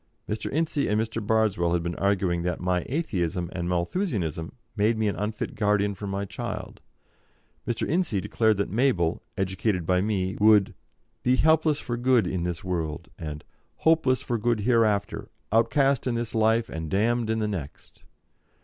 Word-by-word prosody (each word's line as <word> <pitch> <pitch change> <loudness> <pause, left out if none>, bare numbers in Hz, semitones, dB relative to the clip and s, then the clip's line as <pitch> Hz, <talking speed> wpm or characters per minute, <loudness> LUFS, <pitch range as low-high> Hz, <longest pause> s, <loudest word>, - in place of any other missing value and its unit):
Mr. 105 - -3
Ince 160 +1 -1
and 105 -7 +2
Mr. 110 0 -2
Bardswell 105 -6 +2
had 85 -1 0
been 85 0 -2
arguing 95 -3 +1
that 90 +1 -2
my 90 -1 0
Atheism 90 - -2
and 85 -1 -3
Malthusianism 85 - -1 0.2
made 110 +2 +2
me 110 -1 +1
an 100 - 0
unfit 105 +1 -3
guardian 105 -1 +1
for 100 +1 -7
my 100 +1 -2
child; 105 0 -6 0.9
Mr. 120 -2 -1
Ince 175 +3 +1
declared 110 +2 +1
that 100 - -1
Mabel, 100 -9 +1 0.2
educated 95 -1 -1
by 90 +1 +2
me, 95 -2 -1
would 105 -2 +5 0.5
"be 125 +1 +3
helpless 155 +1 +3
for 120 -1 -4
good 120 -3 +3
in 90 0 -2
this 85 -2 -3
world," 80 -5 -3
and 75 -2 -6 0.3
"hopeless 160 -6 +2
for 120 -2 -1
good 115 0 +1
hereafter, 110 -3 +1 0.2
outcast 130 +5 +2
in 120 - 0
this 115 -1 -3
life 115 +1 +2
and 80 -1 -5
damned 115 +4 +1
in 110 - +1
the 110 -1 0
next." 85 -9 -7
105 Hz, 165 wpm, -26 LUFS, 90-120 Hz, 0.9 s, would